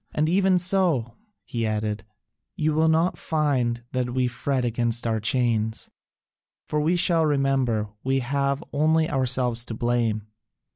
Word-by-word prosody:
And 155 +1 +2
even 190 +2 +3
so," 175 -10 +1 0.3
he 115 -1 -3
added, 105 -1 -2 0.5
"you 155 0 0
will 160 +1 +3
not 160 +3 +2
find 130 -7 0
that 125 -1 -2
we 130 -1 +2
fret 125 +1 -1
against 120 0 0
our 110 -1 0
chains, 110 -1 0 0.7
for 150 - -1
we 165 +4 +2
shall 170 -2 +3
remember 135 -7 +1
we 135 +1 +1
have 140 +3 -1
only 155 +2 +2
ourselves 125 -5 0
to 115 - -6
blame. 115 -3 0
130 Hz, 140 wpm, -24 LUFS, 120-155 Hz, 0.7 s, even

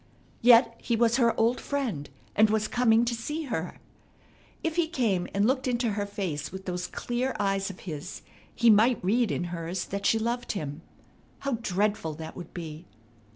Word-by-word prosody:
Yet 230 -1 +6
he 235 - 0
was 235 +1 +3
her 235 -3 +3
old 230 +2 +2
friend, 245 - -2 0.3
and 215 +1 +5
was 215 0 +1
coming 235 -1 +3
to 235 - 0
see 295 +8 -3
her. 180 - -4 0.8
If 325 -1 -1
he 345 -2 +2
came 225 - 0
and 200 +1 +2
looked 260 +2 +1
into 240 -2 +1
her 205 0 -2
face 185 -8 -4
with 190 +1 -8
those 180 -1 -3
clear 250 +6 -2
eyes 195 -1 0
of 190 - -10
his, 160 -1 -7 0.3
he 235 -1 +6
might 220 0 +4
read 230 +3 +3
in - - -1
hers 170 +2 -3
that 200 +1 -2
she 225 - +4
loved 235 +2 -2
him. 150 -5 -5 0.6
How 275 -5 -1
dreadful 200 -6 0
that 160 0 -8
would 175 -2 -9
be! 165 -1 -7
215 Hz, 180 wpm, -28 LUFS, 180-240 Hz, 0.8 s, Yet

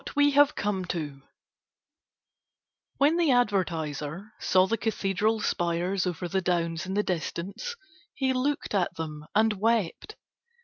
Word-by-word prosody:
WHAT - - -9
WE 290 0 +5
HAVE 285 0 +5
COME 200 -2 -1
TO 150 -6 -4 1.8
When 295 +4 +4
the 340 -3 +3
advertiser 180 - 0
saw 185 0 +4
the 225 - 0
cathedral 215 0 0
spires 175 +2 0
over 175 0 -3
the 190 +2 0
downs 170 -1 -1
in 190 - -3
the 210 - +2
distance, 190 - -3 0.4
he 265 -2 +1
looked 280 +1 -1
at 190 -4 +1
them 150 -2 -6
and 220 +1 +4
wept. 225 - 0
195 Hz, 135 wpm, -27 LUFS, 170-230 Hz, 1.8 s, WE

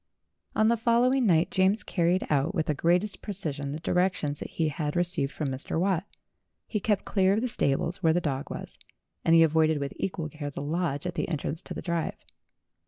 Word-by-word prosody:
On 215 - +4
the 235 +1 +3
following 240 +2 +3
night 165 -2 +3
James 190 +3 +2
carried 175 0 +1
out 150 +6 +1
with 160 -3 +1
the 150 - +1
greatest 175 +7 +1
precision 150 -9 -4
the 150 - -4
directions 175 -4 0
that - - -6
he 160 -2 0
had 150 +1 -3
received 175 -5 +1
from 150 -3 -3
Mr. 135 +4 -3
Watt. 185 0 +1 0.6
He 215 - -2
kept 205 0 0
clear 190 -1 +3
of 215 - +1
the 255 - 0
stables 170 - 0
where 165 -3 +4
the 175 - +2
dog 140 -5 -3
was, - - -7 0.4
and 165 - +5
he 165 - +8
avoided 160 0 +3
with 140 -1 -3
equal 170 -4 -3
care 150 -1 -5
the 145 - -7
lodge 150 -1 -1
at 180 - -2
the 175 - -2
entrance 160 0 -2
to - - -7
the - - -6
drive. 170 -2 -2
170 Hz, 205 wpm, -28 LUFS, 150-190 Hz, 0.6 s, he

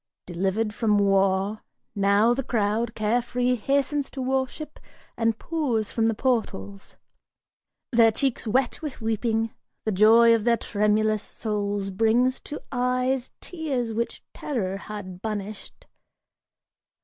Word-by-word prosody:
Delivered 195 +5 -1
from 210 -2 +2
war, 195 +1 +2 0.3
now 200 +3 +3
the 265 - -1
crowd, 225 -1 -1
carefree, 245 +3 +1
hastens 275 +3 0
to 275 - -9
worship 265 +4 -2 0.4
And 225 -1 +1
pours 255 -11 -1
from 225 -1 +1
the 225 - +1
portals. 210 -5 -2 0.9
Their 230 -2 +5
cheeks 255 +1 0
wet 250 +7 0
with 300 -4 -6
weeping, 225 0 -1 0.3
the 220 - +1
joy 225 +4 +6
Of 225 -2 +1
their 235 0 +3
tremulous 210 0 +1
souls 205 -2 -3
brings 230 +6 +2
to 295 - -7
eyes 255 0 0
tears 275 -9 -3
which 235 +2 -3
terror 195 -9 -3
Had 195 -3 -8
banished. 210 -1 -6
225 Hz, 120 wpm, -25 LUFS, 210-250 Hz, 0.9 s, joy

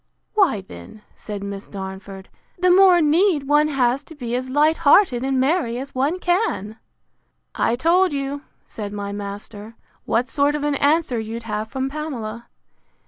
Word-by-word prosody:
Why, 380 - +2
then, 190 - -13
said 205 -2 -7
Miss 200 0 -6
Darnford, 190 0 -8 0.3
the 365 0 +3
more 365 -1 +6
need 320 +1 +3
one 295 +1 +4
has 265 -2 +1
to 320 - -12
be 240 -5 -5
as 255 +1 -3
light 300 +4 +3
hearted 285 -5 +4
and 265 -1 0
merry 265 -3 +1
as 270 +2 -7
one 280 +7 0
can. 350 - -1 0.7
I 230 - +1
told 350 +7 +3
you, 280 0 -3 0.2
said 205 -2 -7
my 200 -1 -4
master, 205 +2 -7 0.3
what 245 +2 +1
sort 285 +2 +2
of 295 - -3
an 295 0 +1
answer 285 -3 +1
you'd 225 +1 -6
have 215 -1 -3
from 265 +3 -3
Pamela. 240 -6 -6
260 Hz, 160 wpm, -21 LUFS, 215-305 Hz, 0.7 s, more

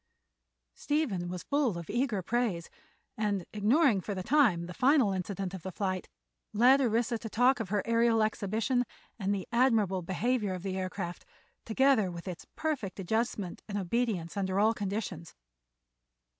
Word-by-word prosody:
Stephen 255 - -1
was 180 -1 -5
full 280 -10 +1
of 170 -2 -7
eager 240 -5 -1
praise 225 -7 -1 0.5
and, 200 -4 0
ignoring 220 - +3
for 200 +2 -4
the 185 - -4
time 220 - +3
the 180 - -8
final 255 - +3
incident 190 0 -3
of 190 - -6
the 190 - -6
flight, 185 0 -3 0.4
led 250 +6 +6
Orissa 235 -1 +1
to 225 - -6
talk 250 +4 +3
of 220 -5 -4
her 205 0 0
aërial 230 -1 +3
exhibition 220 +4 0 0.4
and 195 -1 0
the 195 -2 -2
admirable 225 -7 +2
behavior 205 +3 -1
of 180 - -8
the 190 -1 -3
aircraft, 185 -2 -4 0.4
together 230 -3 +3
with 170 +1 -8
its 180 -2 -7
perfect 260 - -3
adjustment 205 -1 -2
and 205 - -2
obedience 195 -3 -1
under 190 -1 0
all 220 +2 +4
conditions. 200 -5 -4
210 Hz, 155 wpm, -30 LUFS, 185-240 Hz, 0.5 s, led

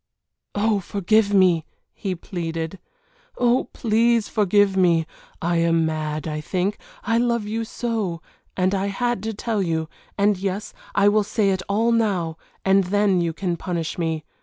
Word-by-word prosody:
"Oh, 210 0 +2
forgive 200 +3 +1
me!" 185 -5 +4 0.3
he 190 -3 -3
pleaded. 165 0 -4 0.6
"Oh, 245 +1 +3
please 230 0 +2
forgive 205 -1 +3
me! 170 -4 +3 0.4
I 170 0 +1
am 165 -1 +3
mad, 155 -1 -2
I 150 -1 -3
think, 185 +5 -1 0.2
I 230 +2 +2
love 235 -2 +1
you 225 +2 -2
so 220 -7 -2 0.4
and 185 +1 +2
I 195 0 0
had 240 +2 -1
to 220 +1 -3
tell 220 0 -1
you 160 -3 -1 0.3
and 200 -1 +2
yes, 195 +1 -3 0.2
I 200 - +4
will 210 +1 +4
say 210 -1 +1
it 190 -1 -1
all 225 +4 +2
now, 190 -8 +1 0.3
and 195 0 +4
then 200 -1 +2
you 170 -1 0
can 175 0 -2
punish 170 -2 -3
me. 160 -2 -1
195 Hz, 160 wpm, -23 LUFS, 170-215 Hz, 0.6 s, me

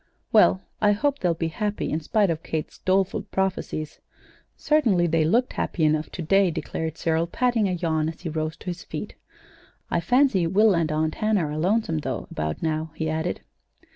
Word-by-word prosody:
"Well, 95 +2 +5 0.2
I 205 -1 +5
hope 280 +6 0
they'll 175 -2 +1
be 165 0 -2
happy, 210 +5 -2
in 155 - 0
spite 195 +4 +1
of 160 -1 -3
Kate's 160 -2 -5
doleful 190 0 +1
prophecies. 185 -5 -2 0.6
Certainly 235 - +2
they 165 -1 +2
looked 235 +11 +2
happy 165 - -2
enough 155 0 +1
to 175 - -4
day," 195 +3 +4
declared 160 -1 -4
Cyril, 165 0 0
patting 235 0 +1
a - - -1
yawn 160 -3 0
as 160 - -9
he 175 - -4
rose 155 +1 -3
to - - -15
his 180 -1 -5
feet. - - -6 0.8
"I - - +2
fancy 215 -1 +3
Will 210 +4 +4
and 165 -3 +1
Aunt 155 +1 0
Hannah 215 -6 +1
are 150 0 -4
lonesome, 180 -2 +1
though, - - -4
about 75 0 -3
now," 160 0 -2
he 160 -1 -2
added. 160 +2 -2
170 Hz, 185 wpm, -25 LUFS, 160-200 Hz, 0.8 s, Well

